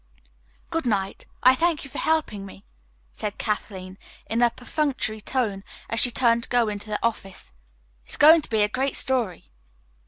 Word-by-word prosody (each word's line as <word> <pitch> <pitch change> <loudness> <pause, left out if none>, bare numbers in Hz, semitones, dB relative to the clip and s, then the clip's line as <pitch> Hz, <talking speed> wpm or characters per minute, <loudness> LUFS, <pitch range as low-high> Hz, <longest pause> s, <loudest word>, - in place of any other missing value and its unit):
"Good 325 -5 -1
night. 195 -3 -2 0.2
I 255 - +7
thank 330 +2 0
you 275 - -11
for - - -5
helping 305 -11 0
me," 195 0 -12 0.5
said 210 -1 -5
Kathleen 190 -3 -4 0.3
in 230 +2 -1
a 240 - +5
perfunctory 250 -3 -3
tone 210 -5 -2 0.3
as 230 - +3
she 245 - +8
turned 235 -1 +2
to - - -3
go 240 -3 +2
into 205 +1 -5
the 210 - -1
office. 195 - -4 0.5
"It - - -24
is - - -5
going 315 +2 +7
to - - -3
be 220 -2 +2
a - - +3
great 265 +6 -2
story." 240 - -1
230 Hz, 180 wpm, -24 LUFS, 205-260 Hz, 0.5 s, she